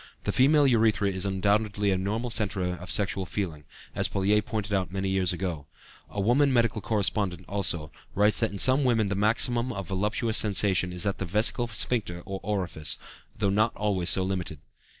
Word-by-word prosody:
The -, -, -1 dB
female 145 Hz, +3 st, +4 dB
urethra 110 Hz, -5 st, +2 dB
is 95 Hz, +1 st, -2 dB
undoubtedly 100 Hz, +1 st, 0 dB
a -, -, +2 dB
normal 110 Hz, +6 st, -3 dB
centre 95 Hz, -4 st, -1 dB
of 90 Hz, 0 st, -11 dB
sexual 95 Hz, +3 st, 0 dB
feeling, 80 Hz, -6 st, -4 dB, 0.3 s
as -, -, +1 dB
Pouillet 100 Hz, +2 st, +1 dB
pointed 110 Hz, -3 st, -4 dB
out 95 Hz, -2 st, -1 dB
many 95 Hz, 0 st, -2 dB
years 95 Hz, -2 st, +1 dB
ago; 85 Hz, -5 st, -4 dB, 0.4 s
a 105 Hz, -, -6 dB
woman 125 Hz, +8 st, +3 dB
medical 115 Hz, -3 st, +1 dB
correspondent, 100 Hz, -4 st, -1 dB
also, 90 Hz, -6 st, -1 dB, 0.2 s
writes 105 Hz, +2 st, +4 dB
that 115 Hz, -, +1 dB
in 100 Hz, -, -7 dB
some 130 Hz, +7 st, +5 dB
women 115 Hz, -5 st, +2 dB
the 100 Hz, -, -1 dB
maximum 115 Hz, +4 st, +1 dB
of 100 Hz, -6 st, -6 dB
voluptuous 105 Hz, +4 st, 0 dB
sensation 95 Hz, -3 st, +2 dB
is 90 Hz, +1 st, +1 dB
at 100 Hz, -, -2 dB
the 95 Hz, -, -2 dB
vesical 110 Hz, +5 st, +1 dB
sphincter 105 Hz, -6 st, -2 dB
or 95 Hz, 0 st, -5 dB
orifice, 90 Hz, -6 st, -2 dB, 0.4 s
though 100 Hz, -2 st, 0 dB
not 110 Hz, +3 st, +1 dB
always 95 Hz, -4 st, 0 dB
so 95 Hz, -, +2 dB
limited. 95 Hz, -4 st, -3 dB
100 Hz, 180 wpm, -27 LUFS, 95-110 Hz, 0.4 s, some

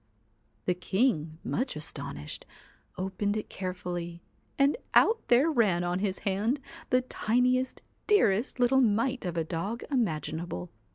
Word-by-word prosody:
The 180 Hz, -, +2 dB
king, 180 Hz, -, 0 dB
much 255 Hz, +3 st, -1 dB
astonished, 140 Hz, -, -6 dB, 0.5 s
opened 200 Hz, +2 st, -1 dB
it 215 Hz, -, -5 dB
carefully 175 Hz, -2 st, -5 dB, 0.3 s
and 280 Hz, +1 st, +4 dB, 0.2 s
out 450 Hz, +1 st, +6 dB
there 265 Hz, +7 st, +5 dB
ran 200 Hz, -, +3 dB
on 175 Hz, +1 st, 0 dB
his 190 Hz, -1 st, -1 dB
hand 210 Hz, +8 st, +1 dB, 0.3 s
the 255 Hz, -, +4 dB
tiniest, 250 Hz, +2 st, +1 dB, 0.2 s
dearest 250 Hz, -, +3 dB
little 255 Hz, +2 st, +4 dB
mite 240 Hz, +2 st, +1 dB
of 175 Hz, -1 st, -3 dB
a 165 Hz, -, +2 dB
dog 185 Hz, +8 st, -3 dB
imaginable. 160 Hz, -, -2 dB
200 Hz, 125 wpm, -29 LUFS, 175-250 Hz, 0.5 s, out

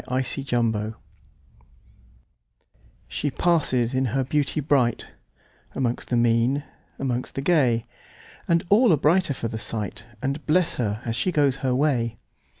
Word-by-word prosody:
1840 120 Hz, -4 st, 0 dB
The 110 Hz, -, -9 dB, 1.8 s
Secret -, -, -35 dB, 0.2 s
SHE 145 Hz, -, -2 dB
passes 135 Hz, -8 st, +2 dB
in 130 Hz, 0 st, +1 dB
her 130 Hz, +3 st, 0 dB
beauty 145 Hz, +3 st, 0 dB
brightAmongst 130 Hz, -2 st, -2 dB
the 125 Hz, -, 0 dB
mean, 120 Hz, +4 st, +2 dB, 0.3 s
amongst 125 Hz, -2 st, -3 dB
the 135 Hz, -, -2 dB
gay, 135 Hz, -8 st, +2 dB, 0.6 s
And 170 Hz, 0 st, +2 dB
all 220 Hz, +2 st, +5 dB
are 160 Hz, -, +5 dB
brighter 155 Hz, +1 st, +2 dB
for 115 Hz, -, -3 dB
the 110 Hz, 0 st, -5 dB
sight, 105 Hz, 0 st, -5 dB
And 140 Hz, +5 st, -3 dB
bless 170 Hz, +2 st, +2 dB
her 110 Hz, -2 st, -2 dB
as 115 Hz, -1 st, -2 dB
she 180 Hz, +10 st, 0 dB
goes 145 Hz, -5 st, +2 dB
her 130 Hz, -2 st, 0 dB
way. 125 Hz, -5 st, +1 dB
130 Hz, 140 wpm, -24 LUFS, 115-150 Hz, 1.8 s, all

